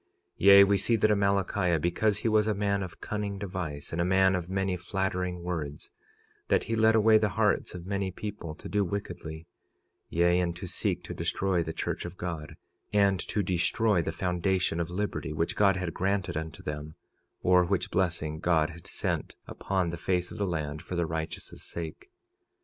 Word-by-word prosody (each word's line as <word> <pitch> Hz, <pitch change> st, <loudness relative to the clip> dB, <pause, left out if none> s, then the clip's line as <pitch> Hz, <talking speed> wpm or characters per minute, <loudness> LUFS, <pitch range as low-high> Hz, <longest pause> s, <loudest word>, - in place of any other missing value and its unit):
46:10 -, -, -46 dB, 0.4 s
Yea, 100 Hz, 0 st, +11 dB
we 100 Hz, 0 st, +3 dB
see 115 Hz, +5 st, +2 dB
that 110 Hz, 0 st, +3 dB
Amalickiah, 100 Hz, -4 st, +2 dB
because 100 Hz, +6 st, +1 dB
he 110 Hz, -, -2 dB
was 110 Hz, -1 st, +3 dB
a 105 Hz, -, +1 dB
man 100 Hz, 0 st, 0 dB
of 95 Hz, -2 st, -7 dB
cunning 105 Hz, -2 st, -3 dB
device 90 Hz, -7 st, -5 dB
and 80 Hz, -, -1 dB
a -, -, +3 dB
man 95 Hz, +1 st, +4 dB
of 90 Hz, -1 st, -2 dB
many 95 Hz, -1 st, 0 dB
flattering 90 Hz, -1 st, -2 dB
words, 80 Hz, -5 st, -4 dB, 0.6 s
that -, -, +3 dB
he 115 Hz, -, -3 dB
led 110 Hz, 0 st, +4 dB
away 110 Hz, 0 st, +6 dB
the 105 Hz, -1 st, +1 dB
hearts -, -, +1 dB
of 85 Hz, -1 st, -7 dB
many 100 Hz, 0 st, -1 dB
people 95 Hz, -4 st, -6 dB
to -, -, -9 dB
do 105 Hz, 0 st, +1 dB
wickedly; 85 Hz, -4 st, -5 dB, 0.6 s
yea, 85 Hz, +1 st, +3 dB
and 85 Hz, -1 st, 0 dB
to 90 Hz, -, -7 dB
seek 90 Hz, -, -2 dB
to -, -, -6 dB
destroy 95 Hz, -3 st, 0 dB
the 80 Hz, -, -3 dB
church -, -, -3 dB
of 90 Hz, +1 st, -7 dB
God, 85 Hz, -4 st, -5 dB, 0.4 s
and 100 Hz, -3 st, +3 dB
to 105 Hz, +3 st, -1 dB
destroy 95 Hz, +2 st, +2 dB
the 80 Hz, -, -2 dB
foundation 90 Hz, 0 st, 0 dB
of 85 Hz, 0 st, -1 dB
liberty 90 Hz, -4 st, -3 dB
which 80 Hz, +2 st, -1 dB
God 100 Hz, -2 st, +4 dB
had 90 Hz, -3 st, -3 dB
granted 95 Hz, -2 st, -1 dB
unto 80 Hz, 0 st, -5 dB
them, 75 Hz, +1 st, -5 dB, 0.5 s
or 90 Hz, 0 st, +5 dB
which 90 Hz, +1 st, -1 dB
blessing 85 Hz, -4 st, 0 dB
God 80 Hz, -2 st, +2 dB
had 85 Hz, 0 st, -13 dB
sent -, -, -2 dB
upon 95 Hz, -3 st, -1 dB
the 85 Hz, -, -5 dB
face 90 Hz, 0 st, -1 dB
of -, -, -8 dB
the 100 Hz, -, +1 dB
land 75 Hz, -3 st, -3 dB
for 90 Hz, -, -6 dB
the 85 Hz, -1 st, +1 dB
righteous' 80 Hz, 0 st, -5 dB
sake. 85 Hz, -, -7 dB
90 Hz, 190 wpm, -29 LUFS, 85-100 Hz, 0.6 s, Yea